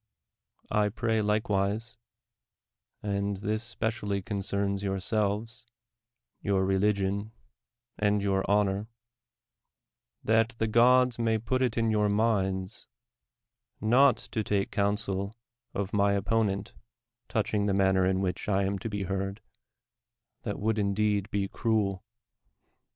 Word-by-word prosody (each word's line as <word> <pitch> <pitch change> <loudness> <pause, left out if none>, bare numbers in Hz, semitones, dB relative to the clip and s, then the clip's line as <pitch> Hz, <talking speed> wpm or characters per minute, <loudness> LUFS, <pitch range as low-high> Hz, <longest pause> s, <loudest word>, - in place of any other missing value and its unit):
I 105 -1 +2
pray 110 +1 0
likewise 105 +1 0 0.5
— - - -49 0.2
and 100 0 -1
this 110 +3 -2
specially 110 -4 -2
concerns 100 -1 -1
yourselves, 105 +4 -1 0.8
your 95 -1 +1
religion, 100 +2 0 0.7
and 105 0 +2
your 95 -1 +1
honor 100 0 +2 0.7
— - - -56
that 115 +1 +2
the 110 - +1
gods 125 +2 +4
may 115 -1 +2
put 120 +4 -1
it 125 -3 0
in 115 -1 +2
yv/ur 105 -1 +2
minds, 95 -3 0 0.9
not 125 +3 +5
to 110 - -3
take 100 -1 0
counsel 100 0 -1 0.4
of 100 0 -3
my 100 -1 +3
opponent 100 0 0 0.6
touching 105 -1 0
the 100 - +1
manner 95 -1 +3
in 95 +1 +1
which 95 +2 -2
I 100 -1 +2
am 100 0 -1
to 115 - -4
be 100 -2 -3
heard 95 +2 -3 0.5
— - - -59
that - - -4
would 110 +1 0
indeed 100 0 +1
be 100 -1 -1
cruel 100 -4 0
105 Hz, 125 wpm, -29 LUFS, 100-110 Hz, 0.9 s, not